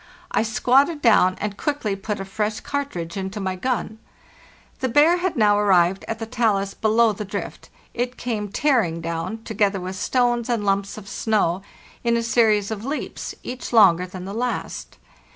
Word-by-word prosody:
I - - +2
squatted 255 +7 +2
down 185 -6 +5
and 205 0 -3
quickly 285 -9 -1
put 205 +1 -4
a 195 - -4
fresh 210 +2 -2
cartridge 200 -13 -4
into 190 +2 -4
my 190 -1 -2
gun. 220 +1 -2 0.8
The 260 - -1
bear 300 +8 +5
had 360 0 -1
now 205 -2 +4
arrived 190 -2 +3
at 225 - -3
the 225 - -5
talus 210 -4 0
below 220 0 +3
the 210 - -5
drift; 195 - -6 0.2
it 245 +1 -3
came 215 -4 -3
tearing 215 - +1
down, 165 +7 -4
together 205 -3 0
with 185 +1 -5
stones 240 +3 +1
and 230 -4 0
lumps 200 +1 0
of 205 -2 -10
snow, 200 -5 0 0.4
in 235 0 +2
a 230 - -1
series 220 -3 +2
of 215 -1 -4
leaps, 285 +5 -4
each 255 +1 -6
longer 185 -6 +5
than 185 0 -8
the 195 - -6
last. 245 +3 -4
215 Hz, 170 wpm, -23 LUFS, 195-240 Hz, 0.8 s, down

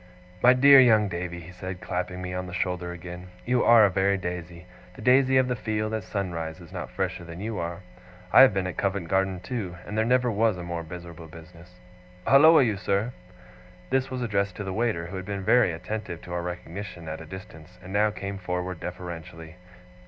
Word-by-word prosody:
'My 125 +1 +7
dear 140 +2 +8
young 110 -5 +5
Davy,' 85 0 -5
he 85 +2 -11
said, 90 +1 -7
clapping 90 0 -4
me 90 0 -4
on 90 0 -4
the 90 - -7
shoulder 90 -1 -2
again, 90 +1 -8 0.2
'you 125 0 +2
are 115 -2 +7
a 100 - +2
very 100 +1 +2
Daisy. 90 -1 -6 0.3
The - - -11
daisy 130 +1 +5
of 130 -1 +4
the 125 - -1
field, 110 -1 -2
at 110 -2 -2
sunrise, 85 -5 -4
is 85 0 -14
not 90 - -5
fresher 90 -1 -3
than 85 0 -9
you 110 +1 -4
are. 85 +2 -4 0.5
I - - +10
have 135 - +8
been 95 -1 -1
at 90 -3 -5
Covent 100 -4 -1
Garden, 95 -1 +1
too, 95 -3 -4
and 105 - -6
there 110 - +2
never 125 +1 +2
was 110 -2 +2
a 90 - -6
more 85 -1 -4
miserable 85 0 -9
business. 85 +2 -14 0.5
Holloa, 155 +2 +7
you 110 -5 0
sir!' 100 +4 0 0.8
This 130 0 +1
was 130 -1 -3
addressed 100 -4 -1
to 105 - -5
the 95 -1 -4
waiter, 110 -6 0
who 95 +3 -6
had 95 - -6
been 100 -1 -4
very 115 -3 +4
attentive 90 +1 -5
to 85 - -7
our 85 - -1
recognition, 90 0 -7
at 80 +1 -5
a 80 - -10
distance, 90 -1 -11
and 95 - -9
now 105 +1 +3
came 100 -1 -6
forward 90 -1 -3
deferentially. 85 -1 -8
95 Hz, 210 wpm, -26 LUFS, 85-110 Hz, 0.8 s, I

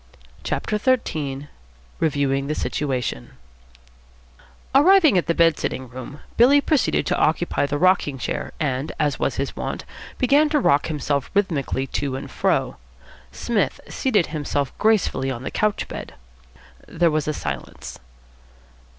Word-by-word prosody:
CHAPTER 210 - -2
XIII 150 - -1 0.5
REVIEWING 140 -3 0
THE 150 - -1
SITUATION 125 - -3 1.4
Arriving 320 - +6
at 180 - +2
the 170 - +1
bed 165 -2 +4
sitting 130 - -3
room, 130 +3 -9 0.2
Billy 265 +5 +6
proceeded 290 0 +1
to - - 0
occupy 155 -2 +1
the 145 - -1
rocking 180 -5 +2
chair, - - -4
and, 140 -1 -1
as 145 -3 0
was 130 - 0
his 135 0 -3
wont, - - -4 0.3
began 285 +4 +4
to 295 -1 +2
rock 140 - +3
himself 145 -3 -2
rhythmically 155 -9 0
to 135 0 -3
and 135 - -7
fro. - - 0 0.5
Psmith 205 - -1
seated 220 -10 +1
himself 145 -3 -2
gracefully 210 -10 +2
on 130 -2 -4
the - - -4
couch 215 -1 0
bed. - - -8 0.7
There 170 0 +2
was 155 -1 -1
a - - +1
silence. 70 - -6
150 Hz, 135 wpm, -22 LUFS, 135-210 Hz, 1.4 s, Arriving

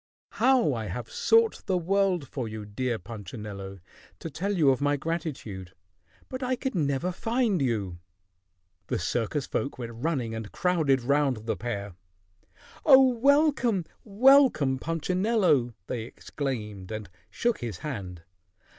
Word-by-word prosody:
"How 255 - +3
I 115 -2 -3
have 115 +5 -6
sought 455 0 +3
the 190 -2 +2
world 185 -3 +1
for 125 -3 -4
you, 110 -1 -6
dear 120 +3 -2
Punchinello, 100 -1 -8 0.4
to 165 - -6
tell 195 +6 -2
you 145 -5 +5
of 130 - -1
my 145 0 +2
gratitude; 130 - -5 0.5
but 255 - -6
I 255 0 0
could 265 +1 -3
never 155 0 0
find 225 - 0
you." 105 -9 -1 0.9
The - - -1
circus 120 - -1
folk 140 - -3
went 120 -2 -6
running 125 -2 -2
and 110 -2 -6
crowded 160 -9 +1
round 135 -4 +1
the 115 - -1
pair. 100 -5 -4 0.9
"Oh, 265 -2 +8
welcome! 255 - +3 0.2
Welcome, 220 - +4
Punchinello!" 165 - +1
they 120 - -3
exclaimed 105 -9 -5
and 110 -2 -5 0.2
shook 240 -2 0
his 115 -7 -5
hand. 95 - -6
140 Hz, 135 wpm, -27 LUFS, -, 0.9 s, Oh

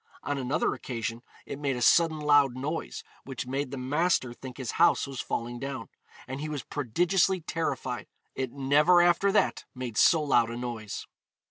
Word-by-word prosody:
On 145 -1 -2
another 130 +1 0
occasion, 115 -1 -5 0.2
it 140 - -7
made 140 -3 -1
a 125 - -4
sudden 165 +3 +5
loud 145 -3 +4
noise, 150 +5 -4 0.2
which 130 -2 -6
made 135 +2 -2
the 135 - -6
master 135 0 +1
think 130 0 -10
his 130 -4 -4
house 170 - +5
was 135 -2 -5
falling 120 +1 -4
down, 130 -5 -5 0.4
and 130 +2 -5
he 155 - -4
was 150 -3 -4
prodigiously 175 - +1
terrified; 135 -6 -3 0.3
it 130 -2 -3
never 145 +6 +4
after 175 +3 +3
that 210 - +1
made 125 -4 -5
so 160 -3 +5
loud 120 -5 +3
a 115 - -5
noise. 120 -4 -5
135 Hz, 170 wpm, -28 LUFS, 125-150 Hz, 0.4 s, sudden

